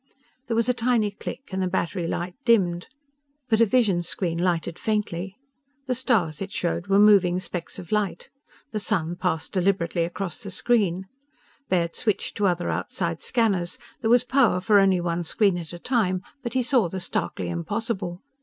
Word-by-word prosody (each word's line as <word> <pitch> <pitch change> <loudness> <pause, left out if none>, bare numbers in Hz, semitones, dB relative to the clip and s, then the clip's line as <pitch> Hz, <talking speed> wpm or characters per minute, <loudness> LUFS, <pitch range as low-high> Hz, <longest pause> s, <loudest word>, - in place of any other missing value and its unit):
There 230 - -1
was 230 0 +2
a 250 - +3
tiny 230 -3 +1
click, 205 - -7
and 190 0 -2
the 185 - +1
battery 180 -1 -1
light 175 +2 -3
dimmed. 180 -7 +2 0.6
But 220 -1 +3
a 230 - +6
vision 205 -7 +3
screen 170 -1 -1
lighted 170 -2 -1
faintly. 200 -4 -2 0.5
The 260 - 0
stars 220 - +1
it 195 0 -4
showed 175 +1 -2
were 195 0 +3
moving 195 -4 +5
specks 175 -2 -5
of 175 - -9
light. 210 -5 -1 0.4
The 215 - -2
sun 175 -5 0
passed 175 -3 -2
deliberately 180 -3 +1
across 175 +3 -4
the 200 - -6
screen. 190 -3 +1 0.6
Baird 170 -2 +1
switched 215 -5 -1
to 205 - +2
other 175 -1 0
outside 165 -2 -2
scanners. 200 -8 0 0.2
There 225 - 0
was 240 +1 +5
power 250 -8 +3
for 205 +2 +4
only 195 -2 +4
one 175 0 -1
screen 180 +2 +1
at 165 -2 -7
a 175 - -6
time. 185 -4 0 0.2
But 235 -3 -5
he 260 -1 +1
saw 240 -8 +3
the 190 - -4
starkly 95 - -2
impossible. 180 - -3
190 Hz, 175 wpm, -25 LUFS, 175-220 Hz, 0.6 s, a